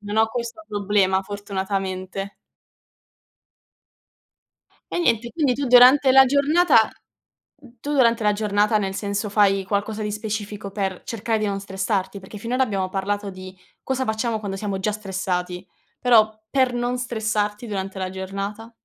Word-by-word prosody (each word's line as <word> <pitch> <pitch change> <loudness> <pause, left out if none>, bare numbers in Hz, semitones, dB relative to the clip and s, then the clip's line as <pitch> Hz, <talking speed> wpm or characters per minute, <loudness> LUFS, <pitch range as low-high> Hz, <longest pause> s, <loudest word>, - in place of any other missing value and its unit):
non 205 0 -5
ho 220 0 +5
questo 235 -2 -5
problema 200 -2 +1
fortunatamente. 195 -1 -4 2.6
E - - -1
niente, 235 -8 +1
quindi 290 -6 +1
tu 280 +3 -3
durante 255 +3 +7
la 265 0 +9
giornata 285 +4 +4 1.0
tu 290 +5 -5
durante 235 -4 +3
la 210 0 +3
giornata 210 +1 +1
nel 195 -2 -2
senso 200 +1 -2
fai 195 -1 +3
qualcosa 205 +2 -2
di 210 - -2
specifico 210 -2 -5
per 190 -2 -3
cercare 225 0 -2
di 215 - 0
non 200 -1 -2
stressarti? 195 0 -2
Perché 190 +2 -11
finora 240 +5 -1
abbiamo 195 -5 -2
parlato 200 +2 -2
di 185 0 -10 0.3
cosa 265 0 -1
facciamo 220 +1 -1
quando 200 -2 -5
siamo 195 -1 -3
già 210 +2 0
stressati, 185 -3 -3 0.3
però 225 -3 +5 0.2
per 260 -2 +2
non 245 +1 -1
stressarti 215 -2 -2
durante 195 -2 -4
la 185 -1 -2
giornata? 195 +4 -6
210 Hz, 145 wpm, -23 LUFS, 195-230 Hz, 2.6 s, la